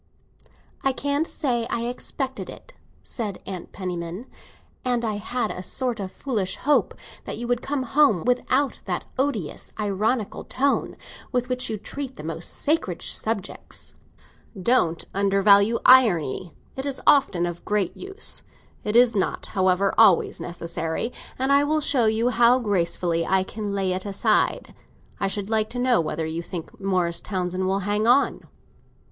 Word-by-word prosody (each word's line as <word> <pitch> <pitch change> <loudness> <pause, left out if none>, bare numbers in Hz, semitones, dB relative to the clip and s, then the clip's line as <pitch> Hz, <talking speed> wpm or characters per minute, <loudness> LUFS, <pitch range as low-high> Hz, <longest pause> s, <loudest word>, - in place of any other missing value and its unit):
"I 270 - +2
can't 285 +4 -1
say 240 -6 -1
I 235 - -1
expected 255 +2 -4
it," - - -12 0.3
said 210 -6 -5
Mrs. 185 -3 -7
Penniman. 180 +2 -5 0.6
"And 245 -2 0
I 215 -2 -1
had 220 +2 -2
a 180 - -6
sort 245 +4 -1
of 190 -2 -4
foolish 210 -8 -2
hope 295 +1 +1 0.3
that - - -4
you 240 - -4
would 245 0 0
come 275 -1 -2
home 265 - +3
without 255 +2 +1
that - - -3
odious 255 - -2
ironical 210 +2 -1
tone 275 +2 0 0.3
with 250 -1 -1
which 255 0 0
you 220 - -2
treat 265 +5 -6
the - - -9
most 165 +1 -5
sacred 290 - -1
subjects." 220 -4 -3 0.7
"Don't 180 -6 +2
undervalue 200 +2 +4
irony, 185 - +4 0.2
it 265 +1 -3
is 275 -2 -2
often 205 -12 +4
of 175 -1 -5
great 205 -4 0
use. 390 +3 -1 0.4
It 210 - -2
is 240 -1 +6
not, 195 - -1
however, 190 0 +2
always 200 -6 +5
necessary, 170 +5 -3 0.2
and 265 +2 0
I 280 +1 +5
will 310 +2 +1
show 270 -5 +2
you 225 +3 +2
how 240 +1 +5
gracefully 175 -6 0
I 190 +2 +2
can 205 +1 -5
lay 190 -2 0
it 185 +2 -3
aside. 200 -1 +1 0.5
I 195 - +1
should 200 0 -2
like 215 -1 +2
to 245 - -6
know 245 -5 +3
whether 155 0 -3
you 160 +1 -3
think 170 -1 -8
Morris 180 -3 +1
Townsend 185 -1 -2
will 195 +1 0
hang 205 +3 0
on." 265 +4 +3
215 Hz, 155 wpm, -24 LUFS, 185-255 Hz, 0.7 s, is